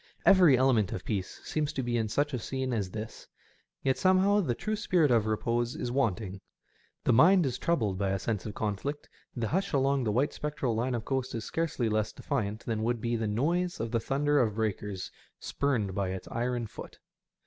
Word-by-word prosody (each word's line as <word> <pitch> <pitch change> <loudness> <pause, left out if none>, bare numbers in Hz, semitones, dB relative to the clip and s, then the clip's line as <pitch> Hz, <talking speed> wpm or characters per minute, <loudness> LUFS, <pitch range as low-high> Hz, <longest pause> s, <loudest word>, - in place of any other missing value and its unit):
Every 175 -9 +7
element 125 -6 +3
of 90 - -6
peace 100 -5 -3
seems 155 -1 -1
to 130 - -2
be 120 0 -1
in 110 -2 0
such 145 +6 0
a 125 - -1
scene 130 +2 -3
as 100 -5 -1
this, 110 +3 -7 0.6
yet 130 -1 +1
somehow 190 +2 +4
the 125 -10 -1
true 215 - -2
spirit 170 -8 +2
of 110 -3 +3
repose 115 +2 0
is 120 - -3
wanting. 110 -7 -1 0.6
The 125 - +3
mind 175 +8 +6
is 130 - -2
troubled 110 - 0
by 100 -1 +1
a 95 - 0
sense 105 0 -3
of 105 - -7
conflict, 110 +8 -3 0.3
the 115 -3 -2
hush 195 +3 -1
along 135 -1 +2
the 105 - +1
white 135 +7 +1
spectral 150 -5 -2
line 120 +3 0
of 115 - -4
coast 130 -2 -2
is 115 - -4
scarcely 160 -7 -1
less 110 0 0
defiant 110 -7 -3
than 110 -2 -1
would 120 +1 0
be 115 +1 -1
the 110 -1 -1
noise 170 +12 0
of 115 0 -3
the 115 - +1
thunder 145 +5 +1
of 110 -4 +1
breakers 105 -3 -3 0.3
spurned 120 -9 -1
by 95 -1 -1
its 95 0 -5
iron 120 0 -1
foot. 105 - -10
120 Hz, 205 wpm, -29 LUFS, 110-140 Hz, 0.6 s, Every